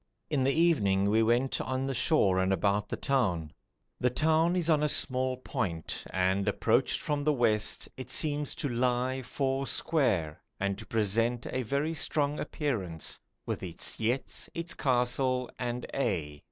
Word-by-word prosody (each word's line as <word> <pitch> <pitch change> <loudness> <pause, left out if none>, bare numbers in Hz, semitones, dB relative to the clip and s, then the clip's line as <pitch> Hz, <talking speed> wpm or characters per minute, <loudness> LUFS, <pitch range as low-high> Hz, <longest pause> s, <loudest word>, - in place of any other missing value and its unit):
In 140 -4 +1
the 135 - +3
evening 105 - +2
we 110 +1 +3
went 120 +4 +1
on 130 +1 -2
the 135 - -2
shore 120 - +2
and 95 +1 +1
about 100 +2 0
the - - -3
town. 90 - 0 0.5
The 125 - +2
town 160 +6 +2
is 175 -3 0
on 155 -3 +3
a 150 - +2
small 130 -2 +4
point 100 - -3
and 95 +1 0
approached - - +2
from 145 -1 -2
the 150 - +3
west 110 -5 +1
it 130 - -8
seems 150 -2 +1
to - - -2
'lie 125 +1 0
four 135 +1 -2
square' 95 - 0 0.2
and 100 0 -1
to - - -10
present 115 +2 +1
a 130 - -1
very 140 +6 -1
strong 150 -1 0
appearance, 100 - -3 0.3
'with - - -3
its - - -1
yetts, 120 +4 -1
its 170 +1 -2
castle, 125 -1 +1
and 125 0 -3
a'.' 85 - -2
125 Hz, 160 wpm, -29 LUFS, 105-140 Hz, 0.5 s, small